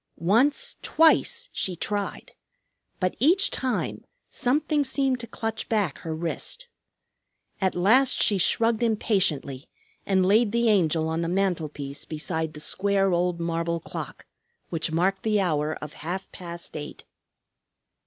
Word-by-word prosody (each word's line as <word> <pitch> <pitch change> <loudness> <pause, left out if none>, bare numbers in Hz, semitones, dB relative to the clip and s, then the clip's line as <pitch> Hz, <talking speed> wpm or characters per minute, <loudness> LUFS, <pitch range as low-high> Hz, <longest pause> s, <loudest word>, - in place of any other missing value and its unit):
Once, 265 - +2
twice, 465 +9 +3
she 185 - -2
tried. 205 +3 -3 0.7
But 185 -1 0
each 350 - +5
time 260 -2 -2 0.3
something 295 +3 +1
seemed 265 -1 0
to 235 - -7
clutch 225 -1 -4
back 205 -9 0
her 160 -1 -4
wrist. 170 - -4 0.9
At 190 -1 +1
last 235 +9 +4
she 200 -2 +3
shrugged 225 +5 +2
impatiently 180 - 0 0.3
and 190 -2 +2
laid 210 +3 +3
the 235 -1 +3
Angel 165 -6 +2
on 160 +1 -1
the 170 - -1
mantelpiece 160 -7 -2
beside 160 0 -3
the - - -8
square 195 +4 +1
old 175 0 0
marble 170 0 -1
clock, - - -8 0.4
which 165 -1 -2
marked 190 +4 +1
the 215 -2 +1
hour 155 -5 0
of 150 -1 -8
half 180 +5 -5
past 170 -1 -7
eight. 150 -1 -7
190 Hz, 135 wpm, -25 LUFS, 165-230 Hz, 0.9 s, each